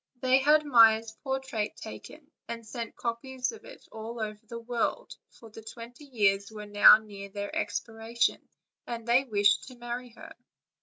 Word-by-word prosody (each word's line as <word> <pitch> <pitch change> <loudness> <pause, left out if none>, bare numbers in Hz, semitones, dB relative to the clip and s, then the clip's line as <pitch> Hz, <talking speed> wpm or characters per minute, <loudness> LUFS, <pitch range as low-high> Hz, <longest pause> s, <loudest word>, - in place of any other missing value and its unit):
They 260 +1 +4
had 300 +3 +4
Maia's 225 -4 +5
portrait 265 -6 -3
taken, 295 +7 -11 0.2
and 230 -1 -7
sent 230 0 -7
copies 250 +2 -3
of 450 - -13
it - - -14
all 225 +2 -7
over 215 -1 -4
the 235 - -7
world; 240 - -3
for 225 -2 -16
the 225 - -11
twenty 235 +5 -11
years 200 -6 +1
were 210 -1 -8
now 205 0 +8
near 200 -2 -10
their 200 +1 -6
expiration, 225 +1 -1 0.5
and 235 -1 -6
they 245 +3 +4
wished 205 -3 +2
to 255 - -11
marry 240 +1 -6
her. - - -12
230 Hz, 160 wpm, -28 LUFS, 215-250 Hz, 0.5 s, now